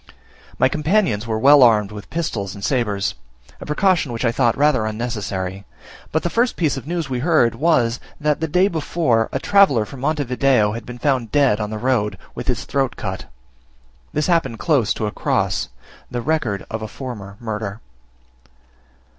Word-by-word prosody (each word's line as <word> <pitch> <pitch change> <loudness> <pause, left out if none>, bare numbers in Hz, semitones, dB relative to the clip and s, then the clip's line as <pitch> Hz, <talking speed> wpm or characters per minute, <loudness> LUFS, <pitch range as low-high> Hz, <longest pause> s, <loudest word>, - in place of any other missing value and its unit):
My - - +4
companions 150 - +1
were 110 -1 -1
well 140 +5 +6
armed 105 -4 +5
with 105 -1 -9
pistols 110 - -3
and 100 - -5
sabres; 105 -7 0 0.5
a - - -9
precaution 160 -2 +2
which 115 +2 -2
I 115 - +3
thought 120 -1 +1
rather 140 -6 +3
unnecessary 100 -4 -4 0.5
but 160 - 0
the 175 - 0
first 240 +2 +1
piece 160 -4 0
of 135 +1 -7
news 170 -3 -2
we 130 -2 -2
heard 150 -5 +3
was, 125 -4 +2 0.2
that, 150 -1 +1
the 160 - -1
day 180 +5 +3
before, 155 - 0
a - - -1
traveller 140 - +4
from 135 +4 -10
Monte 150 +2 0
Video 125 -4 +2
had 115 +1 -7
been 125 0 -7
found 125 -4 0
dead 135 -7 +3
on 105 -1 -2
the 110 - -4
road, 120 -3 0 0.2
with - - -7
his - - -1
throat 135 -3 -1
cut. 95 -2 -5 0.9
This 150 0 0
happened 165 -10 +1
close 130 -6 +1
to 110 - -2
a 105 - -2
cross, - - -1 0.4
the 120 - -3
record 130 -10 -1
of 110 0 -3
a 110 - -4
former 105 -5 -8
murder. 110 -2 -4
125 Hz, 180 wpm, -20 LUFS, 110-150 Hz, 0.9 s, well